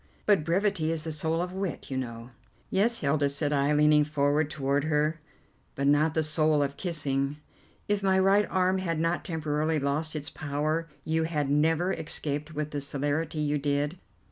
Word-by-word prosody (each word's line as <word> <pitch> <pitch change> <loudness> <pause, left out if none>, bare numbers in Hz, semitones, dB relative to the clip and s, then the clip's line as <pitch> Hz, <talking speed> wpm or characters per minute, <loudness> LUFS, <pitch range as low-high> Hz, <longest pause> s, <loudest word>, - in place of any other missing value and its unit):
"But 200 -7 +4
brevity 175 -1 +1
is 160 -2 -2
the 160 - -3
soul 160 +2 0
of 180 0 -6
wit, 190 -6 -4
you - - -2
know." 120 -1 -5 0.4
"Yes, 230 +4 +2
Hilda," 145 -1 +2
said 145 +1 -1
I, 140 +1 +2
leaning 150 0 +5
forward 145 0 +1
toward 140 0 0
her, 155 +1 +1 0.6
"but 140 - -1
not 150 +2 +3
the 160 - +2
soul 155 -1 +2
of 140 0 -3
kissing. 140 -5 -1 0.5
If 205 -1 +1
my 190 -1 +3
right 195 +2 +4
arm 185 0 +2
had 165 -4 -2
not 165 +2 0
temporarily 155 -1 -1
lost 150 +3 -1
its 145 -1 -4
power 155 +2 -2 0.2
you 160 0 +1
had 150 -4 -1
never 160 +5 +2
escaped 150 -1 -3
with 150 0 -3
the 145 - -3
celerity 145 +3 -2
you 150 0 0
did. 145 +4 -1
155 Hz, 175 wpm, -28 LUFS, 145-165 Hz, 0.6 s, leaning